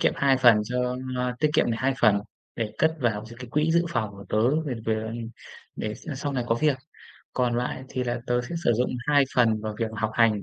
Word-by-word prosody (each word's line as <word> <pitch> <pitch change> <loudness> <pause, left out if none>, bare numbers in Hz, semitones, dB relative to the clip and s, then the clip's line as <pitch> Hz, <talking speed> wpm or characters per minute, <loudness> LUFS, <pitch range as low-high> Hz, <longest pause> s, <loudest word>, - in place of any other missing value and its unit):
kiệm - - +3
2 135 -1 +4
phần 120 -4 +7
cho, 125 +2 -1 0.2
a 125 0 -1
tiết 155 - +4
kiệm 120 - +3
này 115 - -1
2 135 0 +2
phần 105 -3 +5 0.4
để 110 -3 -2
cất 160 - +4
vào 110 -4 0
d 115 - -11
cái 125 - -7
quỹ 150 +4 +2
dự 170 +1 +3
phòng 110 -11 -1
của 100 0 -11
tớ 125 +9 +2
về 145 -5 -3
về 110 0 -1 0.6
để 105 0 -3
s - - -13
sau 140 +1 -3
này 125 -3 -1
có 115 - +2
việc. 140 +1 +1 0.5
Còn 125 -2 +1
lại 125 +1 -2
thì 130 - -2
là 120 0 -2
tớ 120 0 +2
sẽ 125 - -6
sử 120 - +4
dụng 125 +3 +1 0.2
2 145 -1 +5
phần 115 -3 +3
vào 110 0 -4
việc 115 -1 -1
học 110 0 -1
hành 110 -3 +3
120 Hz, 240 wpm, -26 LUFS, 110-130 Hz, 0.6 s, phần